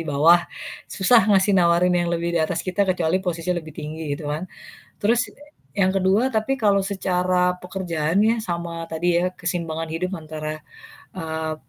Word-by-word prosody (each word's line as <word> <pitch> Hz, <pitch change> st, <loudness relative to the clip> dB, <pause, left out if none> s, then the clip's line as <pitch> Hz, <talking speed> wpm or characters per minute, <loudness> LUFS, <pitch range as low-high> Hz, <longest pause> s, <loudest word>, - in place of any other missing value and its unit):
bawah, 160 Hz, +5 st, +5 dB, 0.5 s
susah 220 Hz, +2 st, +4 dB
ngasih 200 Hz, 0 st, +4 dB
nawarin 180 Hz, -1 st, +4 dB
yang 175 Hz, -1 st, +1 dB
lebih 170 Hz, 0 st, -1 dB
di 170 Hz, -, +2 dB
atas 165 Hz, +2 st, -1 dB
kita 190 Hz, +1 st, 0 dB
kecuali 180 Hz, 0 st, +1 dB
posisi 180 Hz, -1 st, -2 dB
lebih 170 Hz, -3 st, -5 dB
tinggi 150 Hz, -1 st, -4 dB
gitu 145 Hz, -1 st, -4 dB
kan, 165 Hz, +5 st, -4 dB, 0.5 s
terus 235 Hz, +4 st, +3 dB
e 295 Hz, +1 st, -19 dB, 0.2 s
yang 190 Hz, -2 st, +3 dB
ke-2 195 Hz, +6 st, +2 dB
tapi 220 Hz, +5 st, 0 dB
kalau 200 Hz, -2 st, +4 dB
secara 180 Hz, -2 st, +1 dB
pekerjaan 180 Hz, -3 st, -2 dB
ya 230 Hz, +1 st, +3 dB
sama 170 Hz, -2 st, -4 dB
tadi 165 Hz, +2 st, -2 dB, 0.2 s
ya 185 Hz, -, -1 dB
keseimbangan 165 Hz, -3 st, -3 dB
hidup 180 Hz, +3 st, -2 dB
antara, 155 Hz, 0 st, -6 dB, 0.5 s
eee, 160 Hz, -3 st, -3 dB
180 Hz, 160 wpm, -23 LUFS, 165-190 Hz, 0.5 s, bawah